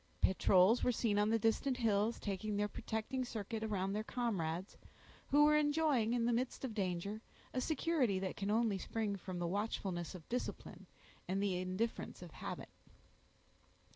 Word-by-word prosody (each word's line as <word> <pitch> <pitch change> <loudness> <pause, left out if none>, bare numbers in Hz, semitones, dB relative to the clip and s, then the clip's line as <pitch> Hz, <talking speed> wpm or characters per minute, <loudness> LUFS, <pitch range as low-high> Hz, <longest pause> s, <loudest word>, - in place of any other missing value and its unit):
Patrols 190 +3 +5
were 250 - +4
seen 215 -3 +1
on 210 +1 +3
the 225 - +4
distant 225 +4 +1
hills, 220 -1 +1
taking 205 +1 -2
their 205 0 +1
protecting 220 +5 -3
circuit 220 -2 -4
around 195 -3 -1
their 215 +1 -1
comrades, 190 -7 -2 0.5
who 290 +1 +5
were 300 0 +6
enjoying, 295 -6 +3
in 235 -1 +1
the 240 - +2
midst 250 +3 -1
of 240 - -4
danger, 200 +1 -2 0.3
a 255 - 0
security 300 - +1
that 190 -1 -3
can 200 0 -3
only 215 -2 +2
spring 215 0 -2
from 185 -1 -6
the 175 - -1
watchfulness 190 -2 -2
of 170 -3 -11
discipline 250 +1 -4 0.4
and 190 +2 0
the 200 -2 +1
indifference 185 +5 -3
of - - -10
habit. - - -6
215 Hz, 165 wpm, -36 LUFS, 195-240 Hz, 0.5 s, were